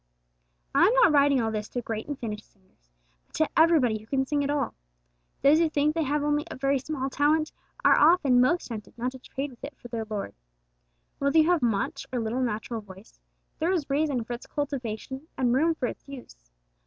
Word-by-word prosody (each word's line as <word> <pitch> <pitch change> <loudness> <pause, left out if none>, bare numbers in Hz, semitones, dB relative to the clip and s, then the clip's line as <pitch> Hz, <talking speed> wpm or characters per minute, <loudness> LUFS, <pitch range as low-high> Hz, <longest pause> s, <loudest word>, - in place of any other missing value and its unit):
I - - +5
am 460 - +2
not - - +6
writing 285 -2 +4
all 225 -2 0
this 210 -1 -4
to 245 - -3
great 220 -1 -4
and 290 -2 -4
finished 215 -4 -6
singers, 185 - -35 0.4
but - - -15
to 315 - +1
everybody 305 -9 +4
who 215 - -17
can 265 +2 0
sing 290 +1 0
at 280 - -2
all. 285 -4 -1 0.7
Those 290 +3 +6
who 335 -1 +3
think 300 0 +1
they 330 - -1
have 295 0 0
only 295 0 +1
a - - -6
very 275 +1 +1
small 270 -1 -3
talent, 305 +3 +2 0.3
are - - +7
often 290 -6 +5
most 340 +6 +1
tempted 220 -1 -8
not 250 +2 -2
to 260 - -11
trade 275 +2 -5
with 240 - -18
it 280 0 -8
for 240 - -12
their 225 -2 -4
Lord. 205 - -4 0.9
Whether 280 +2 +2
you 320 +2 +5
have 345 -4 +2
much 220 -5 -1
or 250 - -1
little 230 +3 -2
natural 225 -1 -3
voice, 195 +1 -15 0.4
there 330 +3 +1
is 335 -7 -1
reason 280 -4 +1
for 240 - -6
its 240 - -8
cultivation 265 -1 -4
and 245 -2 +2
room 320 +5 +2
for 260 - -2
its - - -7
use. 240 - -12
270 Hz, 215 wpm, -27 LUFS, 230-295 Hz, 0.9 s, are